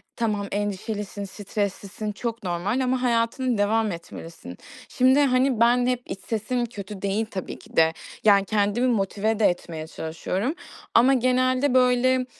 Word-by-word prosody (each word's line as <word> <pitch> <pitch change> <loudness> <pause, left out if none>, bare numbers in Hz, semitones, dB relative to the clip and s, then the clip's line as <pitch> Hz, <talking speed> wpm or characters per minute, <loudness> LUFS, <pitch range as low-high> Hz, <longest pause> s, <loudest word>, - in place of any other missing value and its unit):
Tamam, 210 -3 -1
endişelisin, 205 0 -3
streslisin, 205 +1 -4
çok 230 +1 -5
normal 180 +7 -1
ama 255 0 0
hayatına 235 0 +1
devam 215 +1 +1
etmelisin. 165 - -9 0.3
Şimdi, 260 +2 +4
hani, 255 -3 +2
ben 245 +1 +4
hep 250 -1 0
iç 190 - -6
sesim 235 +4 -2
kötü 205 -3 -8
değil, 200 +3 0
tabii 185 -2 -6
ki - - -17
de. 160 0 +5 0.3
Yani, 200 -2 +5
kendimi 210 +4 +1
motive 215 -1 0
de 215 - +4
etmeye 165 -3 -1
çalışıyorum, 185 - -3 0.4
ama 250 +4 +6
genelde 255 +1 +2
böyle, 255 0 +3
220 Hz, 140 wpm, -24 LUFS, 200-250 Hz, 0.4 s, ama